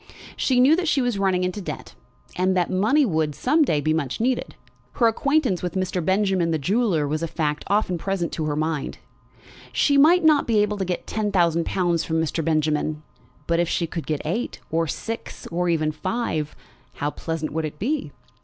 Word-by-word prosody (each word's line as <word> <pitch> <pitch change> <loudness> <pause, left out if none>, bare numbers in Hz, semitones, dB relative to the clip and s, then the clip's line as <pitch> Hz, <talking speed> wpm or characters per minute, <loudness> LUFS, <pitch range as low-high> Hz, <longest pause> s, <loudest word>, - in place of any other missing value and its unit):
She 255 -2 +1
knew 270 +5 +6
that 355 -1 -1
she 300 - +2
was 245 -5 0
running 190 -2 +1
into 185 +3 -2
debt, - - -7 0.4
and 185 +1 +1
that 175 - +1
money 220 +11 +3
would, 155 - 0
some 305 +6 +2
day, 155 - +3
be 155 +2 +1
much 145 -5 -2
needed. 250 +3 -1 0.4
Her 240 - +2
acquaintance 255 - +1
with 180 0 -4
Mr. 185 -2 -1
Benjamin, 190 -1 +1
the 160 - +1
jeweller, 180 - +1
was 155 +2 -2
a 165 - -1
fact 150 -2 -2
often 195 -3 +1
present 195 -2 -2
to 160 - -3
her 150 -1 -1
mind. 155 -1 -2 0.7
She 285 -1 +3
might 340 +5 +6
not 305 -2 +4
be 225 -2 +2
able 210 0 +1
to 190 - 0
get 180 -1 -3
ten 215 -1 -2
thousand 170 -3 +2
pounds 175 -3 +1
from 160 0 -1
Mr. 160 0 -1
Benjamin; 155 -1 0 0.4
but 170 +1 +1
if 175 -1 +1
she 170 - 0
could 165 0 -6
get 155 -2 -2
eight, 200 +11 -2
or 165 +1 +1
six, 225 +9 -6
or 175 +1 0
even 155 -2 +1
five, 155 -2 -3 0.4
how 145 +1 -2
pleasant 160 -1 -4
would 160 0 -1
it 150 -1 -6
be! 265 - -2
180 Hz, 200 wpm, -23 LUFS, 160-220 Hz, 0.7 s, knew